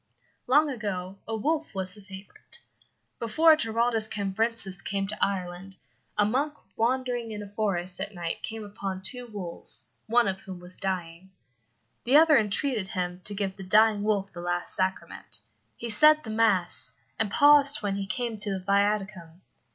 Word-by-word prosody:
Long 295 Hz, +5 st, +5 dB
ago 195 Hz, -5 st, -4 dB
a 225 Hz, -, -2 dB
wolf 310 Hz, +4 st, -1 dB
was 190 Hz, -1 st, -2 dB
the 210 Hz, -, -13 dB
favourite. 195 Hz, -, -11 dB, 0.6 s
Before 310 Hz, +8 st, +5 dB
Giraldus 225 Hz, -4 st, 0 dB
Cambrensis 200 Hz, -1 st, -2 dB
came 195 Hz, -1 st, -2 dB
to 210 Hz, +2 st, -2 dB
Ireland, 190 Hz, 0 st, -3 dB, 0.4 s
a 205 Hz, -, +4 dB
monk 280 Hz, +7 st, 0 dB, 0.2 s
wandering 245 Hz, 0 st, 0 dB
in 210 Hz, -1 st, -6 dB
a -, -, -9 dB
forest 190 Hz, -3 st, -2 dB
at 200 Hz, +2 st, -4 dB
night 170 Hz, -1 st, -4 dB
came 225 Hz, -1 st, -5 dB
upon 195 Hz, -2 st, -6 dB
two 245 Hz, +5 st, -3 dB
wolves, 195 Hz, -6 st, -6 dB, 0.2 s
one 235 Hz, +1 st, +3 dB
of 190 Hz, 0 st, -2 dB
whom 185 Hz, -2 st, -9 dB
was 180 Hz, +1 st, -8 dB
dying. 185 Hz, -2 st, -4 dB, 0.7 s
The 260 Hz, +4 st, +5 dB
other 310 Hz, -3 st, +7 dB
entreated 215 Hz, 0 st, 0 dB
him 180 Hz, -2 st, -3 dB
to 205 Hz, -, -1 dB
give 195 Hz, -1 st, -2 dB
the 195 Hz, -, -8 dB
dying 210 Hz, +2 st, +4 dB
wolf 205 Hz, -2 st, -1 dB
the 175 Hz, -, -7 dB
last 175 Hz, 0 st, -2 dB
sacrament. 170 Hz, -, -3 dB, 0.4 s
He 235 Hz, -1 st, -4 dB
said 305 Hz, +7 st, +5 dB
the 220 Hz, -, -6 dB
mass, 195 Hz, -, +1 dB, 0.3 s
and 220 Hz, -2 st, +1 dB
paused 290 Hz, +1 st, +6 dB
when 200 Hz, -1 st, 0 dB
he 195 Hz, -1 st, -4 dB
came 235 Hz, 0 st, -3 dB
to 210 Hz, 0 st, -3 dB
the 195 Hz, -1 st, -2 dB
viaticum. 195 Hz, -3 st, -1 dB
205 Hz, 165 wpm, -27 LUFS, 190-230 Hz, 0.7 s, other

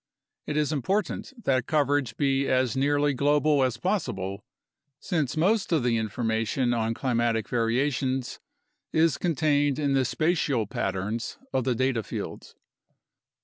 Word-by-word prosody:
It 150 Hz, -, -2 dB
is 150 Hz, 0 st, +1 dB
important 195 Hz, -, -1 dB
that 130 Hz, -3 st, +1 dB
coverage 145 Hz, -5 st, +1 dB
be 135 Hz, -1 st, +1 dB
as 130 Hz, -1 st, +1 dB
nearly 145 Hz, +1 st, +2 dB
global 145 Hz, +1 st, +3 dB
as 130 Hz, -3 st, +1 dB
possible, 105 Hz, -, -2 dB, 0.6 s
since 155 Hz, -6 st, -1 dB
most 195 Hz, +5 st, +2 dB
of 160 Hz, -6 st, +2 dB
the 120 Hz, -2 st, +2 dB
information 115 Hz, +3 st, 0 dB
on 115 Hz, -1 st, 0 dB
climatic 115 Hz, -3 st, 0 dB
variations 130 Hz, +2 st, 0 dB, 0.5 s
is 160 Hz, -2 st, +2 dB
contained 145 Hz, -4 st, +1 dB
in 145 Hz, -2 st, 0 dB
the 135 Hz, -1 st, +3 dB
spatial 150 Hz, -4 st, +1 dB
patterns 95 Hz, +4 st, -3 dB, 0.2 s
of 130 Hz, -2 st, 0 dB
the 125 Hz, -, +1 dB
data 130 Hz, -1 st, +1 dB
fields. -, -, -7 dB
135 Hz, 130 wpm, -26 LUFS, 115-150 Hz, 0.6 s, global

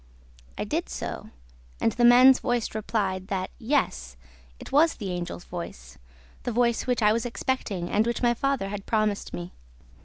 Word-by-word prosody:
I -, -, -2 dB
did -, -, -2 dB
so; 60 Hz, -, -5 dB, 0.5 s
and 225 Hz, -, +2 dB
the 240 Hz, -, -1 dB
man's 250 Hz, +2 st, +8 dB
voice 245 Hz, -3 st, -1 dB
replied 200 Hz, -3 st, -2 dB
that, 190 Hz, -3 st, -3 dB
yes, 65 Hz, -, -1 dB, 0.4 s
it -, -, -10 dB
was 310 Hz, +3 st, +4 dB
the 195 Hz, -4 st, -5 dB
Angel's 175 Hz, 0 st, -5 dB
voice, 60 Hz, -, -8 dB, 0.4 s
the 245 Hz, -, -3 dB
voice 235 Hz, +1 st, +1 dB
which 245 Hz, -2 st, +1 dB
I 210 Hz, 0 st, +5 dB
was 230 Hz, 0 st, 0 dB
expecting 235 Hz, -7 st, -2 dB
and 210 Hz, +5 st, +1 dB
which 235 Hz, +1 st, -2 dB
my 240 Hz, 0 st, +4 dB
father 265 Hz, -5 st, -1 dB
had 200 Hz, -1 st, -6 dB
promised 215 Hz, -2 st, 0 dB
me. 85 Hz, -3 st, -7 dB
220 Hz, 165 wpm, -26 LUFS, 185-245 Hz, 0.5 s, man's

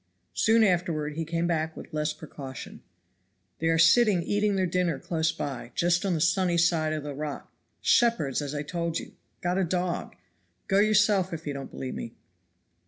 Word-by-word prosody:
Soon 225 Hz, 0 st, +4 dB
afterward 170 Hz, -6 st, +1 dB
he 165 Hz, +2 st, -3 dB
came 165 Hz, +1 st, -1 dB
back 160 Hz, -2 st, -1 dB
with -, -, -10 dB
less 150 Hz, 0 st, 0 dB
precaution. 145 Hz, -4 st, -9 dB, 0.8 s
"They 165 Hz, -, 0 dB
are 165 Hz, 0 st, +3 dB
sitting 180 Hz, +2 st, +5 dB
eating 205 Hz, +2 st, +1 dB
their 190 Hz, -1 st, +1 dB
dinner 175 Hz, -3 st, 0 dB
close 160 Hz, +2 st, -1 dB
by, 130 Hz, -3 st, -6 dB
just 175 Hz, 0 st, +2 dB
on 180 Hz, -, +1 dB
the -, -, -1 dB
sunny 175 Hz, +1 st, +2 dB
side 165 Hz, -2 st, +2 dB
of 155 Hz, -2 st, -3 dB
the 145 Hz, -1 st, -5 dB
rock 150 Hz, +1 st, -6 dB, 0.3 s
shepherds, 230 Hz, -, +2 dB
as 145 Hz, 0 st, -4 dB
I 145 Hz, -, -2 dB
told 170 Hz, +1 st, -2 dB
you -, -, -7 dB, 0.3 s
got 180 Hz, +2 st, 0 dB
a -, -, +2 dB
dog. 180 Hz, 0 st, -2 dB, 0.5 s
Go 195 Hz, -, +3 dB
yourself 205 Hz, -3 st, +3 dB
if 160 Hz, 0 st, -6 dB
you 145 Hz, -, -3 dB
don't 140 Hz, -1 st, -6 dB
believe 130 Hz, -, -6 dB
me." 115 Hz, -, -7 dB
170 Hz, 180 wpm, -27 LUFS, 150-185 Hz, 0.8 s, sitting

